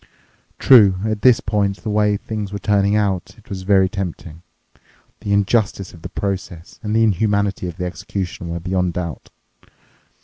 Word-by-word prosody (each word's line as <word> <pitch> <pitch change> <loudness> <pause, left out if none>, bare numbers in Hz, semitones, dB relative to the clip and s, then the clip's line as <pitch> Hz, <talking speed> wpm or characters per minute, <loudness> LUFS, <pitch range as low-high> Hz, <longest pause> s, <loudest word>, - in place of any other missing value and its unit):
True, 105 -8 +6
at 110 -1 -2
this 125 +1 +5
point 100 -2 0
the 110 - -2
way 105 -1 +2
things 105 -1 -5
were 100 - -3
turning 100 0 +1
out 100 -2 -1
it 110 - -21
was 95 -2 -5
very 95 0 +3
tempting. 90 -4 -6 0.8
The 105 -1 -4
injustice 100 -1 +1
of 85 - -14
the - - -7
process 95 -3 -5
and 105 0 -2
the 115 - +4
inhumanity 100 -2 +1
of 85 - -7
the 90 - -3
execution 90 -1 -5
were 85 0 -3
beyond 90 0 -1
doubt. 85 -3 -5
100 Hz, 165 wpm, -20 LUFS, 90-105 Hz, 0.8 s, True